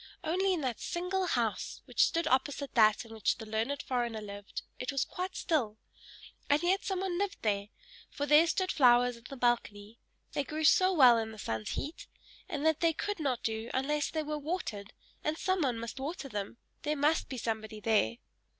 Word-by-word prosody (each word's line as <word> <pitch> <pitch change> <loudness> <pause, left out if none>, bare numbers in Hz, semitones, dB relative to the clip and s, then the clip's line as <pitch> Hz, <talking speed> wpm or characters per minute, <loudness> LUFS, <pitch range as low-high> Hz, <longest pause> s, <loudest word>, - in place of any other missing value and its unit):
Only 375 +4 +1
in 325 - -3
that 255 -5 -2
single 365 +2 -1
house, - - -1
which - - +3
stood 335 +1 -1
opposite 275 +2 0
that 215 -2 +4
in 225 - -11
which 220 -2 0
the 225 - -8
learned 220 +6 -2
foreigner 240 -3 -1
lived, 205 -1 -7 0.2
it 250 - -2
was 275 -2 0
quite 370 +1 -5
still; 235 -10 0 0.7
and 290 +3 +3
yet 375 +3 +2
some 380 -2 -2
one 370 -2 -1
lived 400 -1 -1
there, 200 -2 0 0.4
for 285 - -3
there 300 +3 +6
stood 370 +3 0
flowers 245 -2 +5
in 235 0 -17
the 275 - -7
balcony 230 -3 -1 0.3
they 285 - 0
grew 310 +3 -4
so 370 +4 +6
well 255 -9 +7
in 220 0 -3
the 220 - -11
sun's 110 - -3
heat! 305 +4 -5 0.4
and 295 0 -3
that 320 -1 +3
they 335 -1 +3
could 410 +4 -3
not 270 -6 -1
do 225 +1 -2
unless 290 +3 0
they 315 -1 -2
were 300 0 -3
watered 280 - -4 0.3
and 305 +1 -1
some 375 0 0
one 255 -5 +1
must 230 +3 -6
water 285 +1 -4
them 205 -2 -5 0.2
there 300 0 -1
must 300 +3 +2
be 260 - -5
somebody 220 -2 -3
there. 210 - +2
275 Hz, 195 wpm, -31 LUFS, 225-320 Hz, 0.7 s, well